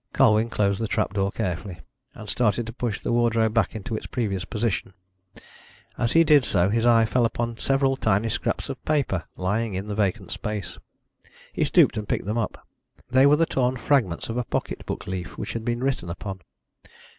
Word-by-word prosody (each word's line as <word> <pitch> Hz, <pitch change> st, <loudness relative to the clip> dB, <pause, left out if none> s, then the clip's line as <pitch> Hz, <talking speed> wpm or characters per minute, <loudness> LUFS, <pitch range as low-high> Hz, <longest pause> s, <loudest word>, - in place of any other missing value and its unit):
Colwyn 115 Hz, -3 st, +4 dB
closed 100 Hz, -3 st, +1 dB
the 115 Hz, -, -1 dB
trap 100 Hz, -, -1 dB
door 100 Hz, -1 st, 0 dB
carefully, 90 Hz, -1 st, -4 dB, 0.4 s
and -, -, -10 dB
started 120 Hz, -1 st, +1 dB
to 115 Hz, -, -7 dB
push 120 Hz, -4 st, -3 dB
the -, -, -3 dB
wardrobe 115 Hz, -2 st, +2 dB
back 115 Hz, 0 st, +1 dB
into 110 Hz, +2 st, -4 dB
its -, -, -5 dB
previous 100 Hz, -6 st, -2 dB
position. 105 Hz, -4 st, -2 dB, 1.0 s
As 120 Hz, 0 st, 0 dB
he 165 Hz, -, +6 dB
did 150 Hz, -3 st, +5 dB
so, 95 Hz, -5 st, +2 dB
his 115 Hz, +3 st, +1 dB
eye 115 Hz, -1 st, +5 dB
fell 120 Hz, +2 st, +1 dB
upon 115 Hz, 0 st, -1 dB
several 135 Hz, -1 st, +2 dB
tiny 105 Hz, -3 st, +1 dB
scraps -, -, -2 dB
of -, -, -7 dB
paper 135 Hz, -, 0 dB
lying 105 Hz, +3 st, -1 dB
in 95 Hz, +2 st, -4 dB
the -, -, -2 dB
vacant 100 Hz, -3 st, -1 dB
space. 105 Hz, -2 st, -4 dB, 0.7 s
He -, -, 0 dB
stooped, -, -, +4 dB
and 105 Hz, -1 st, -4 dB
picked -, -, -1 dB
them 105 Hz, +2 st, -2 dB
up. 115 Hz, -, -4 dB, 0.4 s
They 130 Hz, +2 st, +6 dB
were 145 Hz, -, +6 dB
the 165 Hz, +2 st, +3 dB
torn 130 Hz, -3 st, 0 dB
fragments 120 Hz, -11 st, +1 dB
of 115 Hz, -, -4 dB
a 125 Hz, -, 0 dB
pocket -, -, -4 dB
book -, -, -4 dB
leaf, 90 Hz, -2 st, -5 dB
which -, -, -4 dB
had 115 Hz, -, -4 dB
been 120 Hz, +2 st, -2 dB
written 130 Hz, -10 st, -1 dB
upon. 95 Hz, +2 st, -6 dB
115 Hz, 195 wpm, -25 LUFS, 100-120 Hz, 1.0 s, he